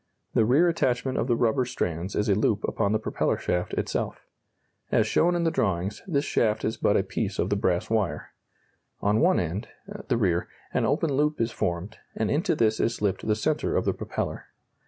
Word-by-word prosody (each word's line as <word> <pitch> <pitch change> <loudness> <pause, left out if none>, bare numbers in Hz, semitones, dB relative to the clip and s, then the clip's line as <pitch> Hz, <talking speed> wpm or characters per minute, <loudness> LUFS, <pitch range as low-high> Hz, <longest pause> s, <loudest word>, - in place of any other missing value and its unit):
The 110 - +4
rear 140 +10 +4
attachment 130 -5 0
of 115 - 0
the 120 - +3
rubber 120 +2 +2
strands 90 -7 -3
is 105 - 0
a 100 - +4
loop 105 +1 +1
upon 100 - 0
the 110 - +3
propeller 110 - -1
shaft 90 0 -2
itself. - - -3 0.7
As - - +3
shown 175 +2 +2
in 170 - 0
the 165 - +2
drawings, 100 - -1
this 145 -5 0
shaft 110 -5 +1
is 110 - -1
but - - +2
a - - +2
piece - - -3
of - - 0
the - - +3
brass 90 -1 0
wire. 110 -5 -1 0.7
On 105 +2 +2
one 180 +3 +4
end 90 +6 -3 0.4
(the 125 - +1
rear) 90 -6 +1 0.3
an - - +2
open 150 +1 +1
loop 150 +2 +1
is 115 0 0
formed, 90 +3 -3 0.2
and 110 - 0
into 155 +2 +1
this 110 -5 +2
is 115 - +1
slipped 100 -1 -2
the 105 - +3
centre 150 +8 0
of - - 0
the - - +2
propeller. - - -4
110 Hz, 200 wpm, -26 LUFS, 100-140 Hz, 0.7 s, The